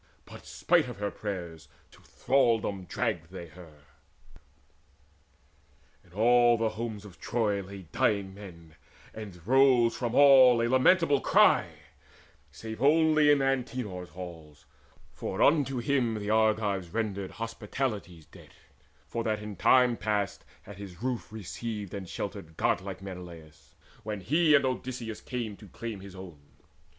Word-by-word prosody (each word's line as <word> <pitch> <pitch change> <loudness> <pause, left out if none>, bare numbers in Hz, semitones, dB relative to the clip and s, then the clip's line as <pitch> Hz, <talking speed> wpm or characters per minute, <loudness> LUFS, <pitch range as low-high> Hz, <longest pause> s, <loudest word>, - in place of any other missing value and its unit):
But, - - -13
spite - - +2
her 100 +1 -4
prayers, 85 -6 -6 0.2
to - - -19
thraldom 115 -8 0
dragged 90 -4 -3
they 85 -2 -9
her. 80 -3 -15 2.2
In 90 - -24
all 120 +3 +4
the 115 0 0
homes 110 -2 -6
of 90 -5 -14
Troy 105 -4 -1
lay 95 0 -10
dying 100 -2 0
men, 85 -5 -12 0.4
And 95 -6 -10
rose 125 -1 +4
from 120 -2 -3
all 130 -4 +7
a 115 - +1
lamentable 140 +3 +3
cry, - - +4 0.8
Save 110 - -8
only 155 +1 +4
Antenor's 130 -9 0
halls; 80 -5 -11 0.5
for - - -5
unto 140 -3 +3
him 120 -3 0
The 105 0 -3
Argives 110 -4 +1
rendered 100 -1 -3
hospitality's 110 - -4
debt, - - -17 0.5
For 115 - -3
that 110 -2 -1
in 105 -1 -7
time 125 +4 +4
past 105 -3 -2 0.2
had 100 -1 -12
his 100 0 -10
roof 125 -4 -3
received 105 -1 -6
And 95 -3 -6
sheltered 80 -1 -6
godlike 95 +1 -1
Menelaus, 85 -5 -11 0.3
when 105 -2 -5
He 155 - +3
with 140 - +3
Odysseus 125 -3 -4
came 120 -5 -5
to 105 - -14
claim 115 +1 -7
his 95 0 -11
own. 90 -6 -11
105 Hz, 130 wpm, -28 LUFS, 95-125 Hz, 2.2 s, all